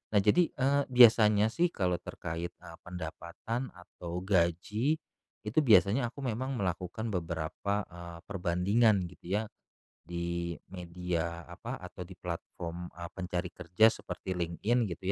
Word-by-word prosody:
Nah -, -, +7 dB
jadi, 165 Hz, +12 st, +5 dB
eee, 140 Hz, +1 st, +3 dB
biasanya 110 Hz, -4 st, +7 dB
sih 175 Hz, +8 st, +3 dB
kalau 90 Hz, -, -1 dB
terkait, 85 Hz, 0 st, -5 dB
eee, 85 Hz, -2 st, -12 dB
pendapatan 90 Hz, +8 st, -5 dB
atau 90 Hz, 0 st, -7 dB
gaji, 95 Hz, -, +2 dB, 0.5 s
itu 110 Hz, +8 st, +1 dB
biasanya 120 Hz, -2 st, +5 dB
aku 135 Hz, +4 st, -8 dB
memang 130 Hz, +3 st, -2 dB
melakukan 95 Hz, +2 st, -2 dB
beberapa, 90 Hz, +3 st, -2 dB
eee, 85 Hz, -1 st, -9 dB
perbandingan 100 Hz, +3 st, +2 dB
gitu 90 Hz, +2 st, -4 dB
ya, 110 Hz, -, +1 dB, 0.6 s
di 85 Hz, 0 st, -3 dB, 0.2 s
media, 85 Hz, -2 st, -3 dB
apa, -, -, -7 dB
atau 90 Hz, -1 st, -9 dB
di 95 Hz, -, -11 dB
platform 85 Hz, 0 st, -6 dB, 0.2 s
pencari 90 Hz, -1 st, -3 dB
kerja 90 Hz, +6 st, +4 dB
seperti 95 Hz, -, -6 dB
LinkedIn 95 Hz, +7 st, 0 dB
gitu 85 Hz, +2 st, -7 dB
90 Hz, 125 wpm, -31 LUFS, 85-110 Hz, 0.6 s, Nah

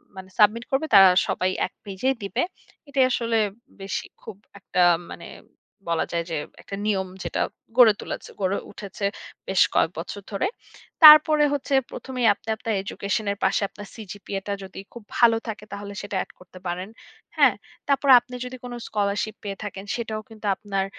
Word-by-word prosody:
মানে 190 Hz, 0 st, -10 dB
সাবমিট 215 Hz, +2 st, +4 dB
করবে 270 Hz, +4 st, +1 dB
তারা 195 Hz, -1 st, +10 dB, 0.2 s
সবাই 185 Hz, -, 0 dB, 0.2 s
১ -, -, -9 dB
পেজেই 210 Hz, +7 st, -1 dB
দিবে। 200 Hz, -1 st, -1 dB, 0.5 s
এটাই 270 Hz, -2 st, +3 dB
আসলে 230 Hz, -2 st, 0 dB, 0.4 s
বেশি 195 Hz, -, -4 dB, 0.2 s
খুব -, -, -9 dB, 0.2 s
একটা 185 Hz, -2 st, -1 dB, 0.3 s
মানে -, -, -9 dB, 0.6 s
বলা 165 Hz, -1 st, +1 dB
যায় 170 Hz, 0 st, -1 dB
যে 165 Hz, -, -2 dB, 0.3 s
একটা 195 Hz, -, -7 dB
নিয়ম 195 Hz, -3 st, 0 dB, 0.2 s
যেটা -, -, -2 dB, 0.4 s
গড়ে 235 Hz, -4 st, +8 dB
তুলেছে -, -, -6 dB
গড়ে 190 Hz, +1 st, +1 dB
উঠেছে 200 Hz, 0 st, -6 dB, 0.4 s
বেশ 190 Hz, -1 st, +2 dB
কয়েক 160 Hz, -, +3 dB
বছর 200 Hz, +4 st, -6 dB
ধরে। 200 Hz, -, 0 dB, 0.6 s
তারপরে 305 Hz, 0 st, +9 dB
হচ্ছে 285 Hz, 0 st, -3 dB, 0.2 s
প্রথমেই 255 Hz, -3 st, -2 dB
আপনি 205 Hz, -, -27 dB
আপনার 220 Hz, 0 st, -3 dB
এজুকেশনের 200 Hz, +1 st, -2 dB
পাশে 190 Hz, -, +2 dB
আপনার 205 Hz, -1 st, -11 dB
সিজিপিএ 205 Hz, -2 st, -6 dB
টা 200 Hz, -, -1 dB
যদি 190 Hz, 0 st, -9 dB
খুব 235 Hz, -, -10 dB
ভালো 230 Hz, -2 st, +5 dB
থাকে 210 Hz, -1 st, -6 dB
তাহলে 200 Hz, 0 st, -7 dB
সেটা 205 Hz, 0 st, -6 dB
অ্যাড -, -, -4 dB
করতে 180 Hz, 0 st, -15 dB
পারেন, 180 Hz, +3 st, -4 dB, 0.5 s
হ্যাঁ? -, -, +6 dB, 0.3 s
তারপর 280 Hz, 0 st, +1 dB
আপনি 245 Hz, +1 st, -11 dB
যদি 255 Hz, +1 st, -7 dB
কোন 245 Hz, -1 st, -7 dB
স্কলারশিপ 210 Hz, +1 st, -1 dB
পেয়ে 200 Hz, -1 st, -5 dB
থাকেন 200 Hz, -1 st, -7 dB
সেটাও 220 Hz, -2 st, -4 dB
কিন্তু 220 Hz, -1 st, -12 dB
আপনার 195 Hz, -2 st, -2 dB
205 Hz, 165 wpm, -24 LUFS, 195-235 Hz, 0.6 s, তারা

